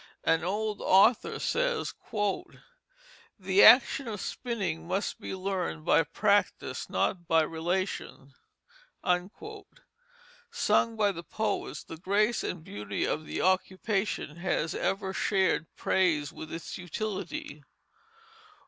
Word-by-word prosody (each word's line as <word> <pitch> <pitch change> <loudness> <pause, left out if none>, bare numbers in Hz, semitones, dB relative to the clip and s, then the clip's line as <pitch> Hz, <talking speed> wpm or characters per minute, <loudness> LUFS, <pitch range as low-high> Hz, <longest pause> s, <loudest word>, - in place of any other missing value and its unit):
An 165 0 +2
old 210 +3 -2
author 205 +5 +4
says: - - -1 1.5
"The 190 +1 +4
action 265 +1 +7
of 210 -3 -4
spinning 195 -12 -3
must 190 +3 -2
be - - -5
learned 185 -4 -3
by 165 - +5
practice, 200 +6 0
not 175 -3 -1
by 165 -1 +4
relation." 165 -4 -3 0.7
Sung 475 - -3
by 210 -2 +2
the 170 -3 -8
poets, 220 0 -2
the 165 - -9
grace 205 +6 +1
and 175 -3 -4
beauty 105 -7 -3
of 155 0 -2
the - - -3
occupation 190 -2 0
has 170 -3 -1
ever 195 -1 -1
shared 190 -5 +1
praise 160 -6 +1
with 155 - -9
its 165 +2 -6
utility. 185 -5 -5
190 Hz, 110 wpm, -29 LUFS, 170-220 Hz, 1.5 s, action